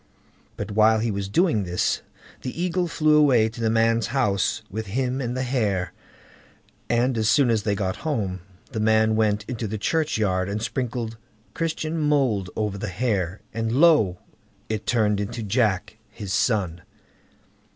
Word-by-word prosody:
But - - -5
while 110 +1 +4
he 110 +1 0
was 100 -1 -3
doing 160 - +2
this, 90 -1 0 0.4
the 130 +5 -6
Eagle 180 0 0
flew 155 -2 +3
away 130 -7 +5
to 115 +1 -9
the 110 - +2
man's 115 0 +2
house 105 -4 0
with 110 +2 -5
him 130 +5 -1
and 125 0 -3
the 130 - -1
hare, 105 -8 -1 1.0
and 120 +2 +2
as 110 0 +2
soon 125 +1 +4
as 110 -2 +2
they 105 -1 0
got 95 -2 -2
home, 105 -12 -2 0.3
the 115 - -3
man 110 0 +3
went 105 -1 +1
into 120 -3 -3
the 110 +2 -3
churchyard 105 - 0
and 100 +2 -2
sprinkled 115 -1 -3 0.4
Christian 165 0 -2
mould 135 -11 +1
over 105 -2 -2
the 105 - -3
hare, 100 -4 -1
and 115 +1 -2
lo! 135 - +4 0.5
it 110 -1 -3
turned 105 -4 +2
into 115 +3 -4
"Jack", 105 -2 0
his 100 -2 -6
son. 95 -8 0
110 Hz, 160 wpm, -24 LUFS, 105-125 Hz, 1.0 s, away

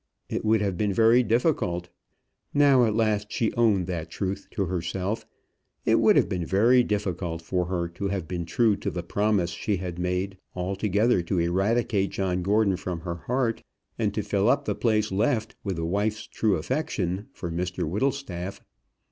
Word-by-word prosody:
It - - -2
would 110 0 +3
have 100 -3 -1
been 105 -1 +1
very 115 +4 +5
difficult, 110 - 0 0.7
now 140 -4 +6
at 110 -2 0
last 105 -2 +1
she 115 - 0
owned 110 -6 +3
that 85 -2 -4
truth 95 +3 -4
to 100 - -1
herself, 95 +4 -3 0.6
it - - +4
would - - +5
have - - +4
been 90 -2 -2
very 115 +9 +4
difficult 90 -6 -2
for 90 +1 -1
her 90 -2 -1
to 100 +4 -4
have 95 -4 -3
been 85 -1 -4
true 110 +2 +3
to - - -3
the 85 - -4
promise 100 -1 +1
she 100 +4 -1
had 90 -1 -5
made, 90 +2 -2 0.2
altogether 100 +4 +1
to 85 +2 -2
eradicate 95 +4 +1
John 90 -2 -1
Gordon 100 0 +2
from 90 -2 -4
her 85 0 -4
heart, 125 -2 0 0.4
and - - +1
to - - -1
fill - - +1
up - - +2
the - - 0
place 110 -3 +1
left 110 +4 0
with 95 -4 -3
a 80 - -2
wife's 105 +5 -1
true 105 -3 +1
affection 95 - -2
for 85 - -6
Mr 90 -1 -2
Whittlestaff. 100 - -2
100 Hz, 175 wpm, -26 LUFS, 90-110 Hz, 0.7 s, now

